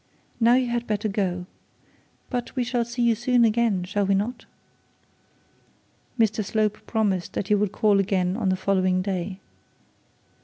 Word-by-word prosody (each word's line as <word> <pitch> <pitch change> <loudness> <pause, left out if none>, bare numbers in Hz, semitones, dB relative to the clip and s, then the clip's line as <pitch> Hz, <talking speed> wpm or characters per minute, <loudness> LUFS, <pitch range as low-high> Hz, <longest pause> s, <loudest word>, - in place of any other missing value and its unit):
Now 235 +1 +5
you 255 -1 +2
had 240 0 -2
better 210 0 -1
go. 185 -3 -2 0.9
But 245 0 -3
we 255 - +1
shall 240 0 0
see 240 +1 -3
you 235 -1 +4
soon 240 +1 +2
again, 220 -4 +1
shall 205 +3 -1
we 195 0 +2
not?' 215 +6 -3 1.7
Mr 215 -1 +2
Slope 215 0 -1
promised 200 -6 -1
that 195 - -3
he - - +4
would 205 -1 +1
call 210 -2 +3
again 185 -2 0
on 210 -4 0
the 185 - +2
following 185 -1 +1
day. 190 -1 -3
210 Hz, 155 wpm, -24 LUFS, 190-235 Hz, 1.7 s, Now